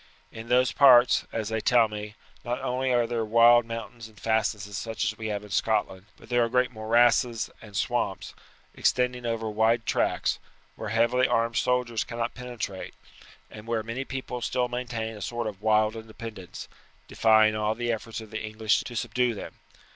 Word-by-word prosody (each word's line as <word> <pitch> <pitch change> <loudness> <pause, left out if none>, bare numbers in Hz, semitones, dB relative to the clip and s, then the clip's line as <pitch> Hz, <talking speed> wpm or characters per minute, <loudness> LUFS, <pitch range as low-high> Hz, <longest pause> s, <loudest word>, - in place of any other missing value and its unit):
In 115 +1 -9
those 125 0 +3
parts, 125 -3 +6
as 110 -2 -3
they 110 0 -2
tell 120 -1 +4
me, 105 0 -7 0.3
not 120 +1 -3
only 130 +1 -1
are 120 -1 +3
there 115 -1 -2
wild 115 +2 +5
mountains 115 0 -7
and 110 -2 -19
fastnesses 105 -2 -1
such 110 +2 -3
as 110 +1 -1
we 110 0 -5
have 105 -1 -3
in 105 - -13
Scotland, 100 -2 -1
but - - -16
there 120 -1 +2
are 115 - -1
great 125 +1 +1
morasses 115 +1 +2
and 105 -3 -8
swamps, - - -2 0.4
extending 125 -1 0
over 115 -1 -2
wide 110 +2 +1
tracts, - - 0 0.4
where 110 - -6
heavy 120 +3 +2
armed 115 0 0
soldiers 125 -3 0
cannot 115 +1 -4
penetrate, 120 -6 -6 0.6
and 105 +1 -11
where 115 -2 -1
many 115 +4 -4
people 130 -2 -6
still 125 +1 0
maintain 120 -2 -4
a 105 - -10
sort 120 +2 -3
of 105 -3 -6
wild 110 0 +2
independence, 110 -4 -9 0.4
defying 110 -1 +4
all 105 0 0
the 120 +1 -1
efforts 115 0 -5
of 110 -1 -12
the 110 - -4
English 110 -1 0
to 120 - -7
subdue 125 +1 0
them. - - -8
115 Hz, 175 wpm, -27 LUFS, 110-120 Hz, 0.6 s, parts